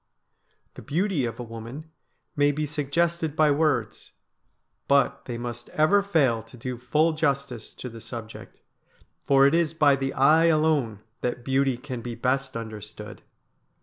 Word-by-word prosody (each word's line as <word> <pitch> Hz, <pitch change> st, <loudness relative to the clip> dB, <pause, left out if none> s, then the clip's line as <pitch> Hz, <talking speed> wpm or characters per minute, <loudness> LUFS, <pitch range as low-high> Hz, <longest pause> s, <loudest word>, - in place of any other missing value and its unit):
The -, -, -11 dB
beauty 165 Hz, -2 st, 0 dB
of 115 Hz, 0 st, -5 dB
a -, -, -4 dB
woman 120 Hz, +7 st, -9 dB, 0.4 s
may 145 Hz, 0 st, +3 dB
be 150 Hz, +1 st, -2 dB
suggested 155 Hz, +2 st, -1 dB
by 155 Hz, -2 st, +4 dB
words, 140 Hz, -7 st, 0 dB, 0.7 s
but 140 Hz, 0 st, +2 dB
they 120 Hz, -2 st, -5 dB
must 120 Hz, 0 st, -6 dB
ever 175 Hz, +7 st, +5 dB
fail 145 Hz, -, +2 dB
to 115 Hz, +3 st, -16 dB
do 125 Hz, 0 st, -5 dB
full 155 Hz, +6 st, +2 dB
justice 140 Hz, -7 st, -2 dB
to -, -, -7 dB
the 115 Hz, -2 st, -10 dB
subject, 115 Hz, -2 st, -9 dB, 0.7 s
for 135 Hz, -1 st, +5 dB
it 140 Hz, -, +4 dB
is 165 Hz, -1 st, +1 dB
by 145 Hz, -3 st, +5 dB
the 135 Hz, 0 st, -2 dB
eye 155 Hz, +5 st, +5 dB
alone 155 Hz, -10 st, +2 dB, 0.2 s
that 120 Hz, 0 st, -3 dB
beauty 135 Hz, -1 st, +1 dB
can 125 Hz, -2 st, -6 dB
be 120 Hz, 0 st, -6 dB
best 130 Hz, +1 st, -1 dB
understood. 105 Hz, -1 st, -8 dB
135 Hz, 150 wpm, -25 LUFS, 120-155 Hz, 0.7 s, ever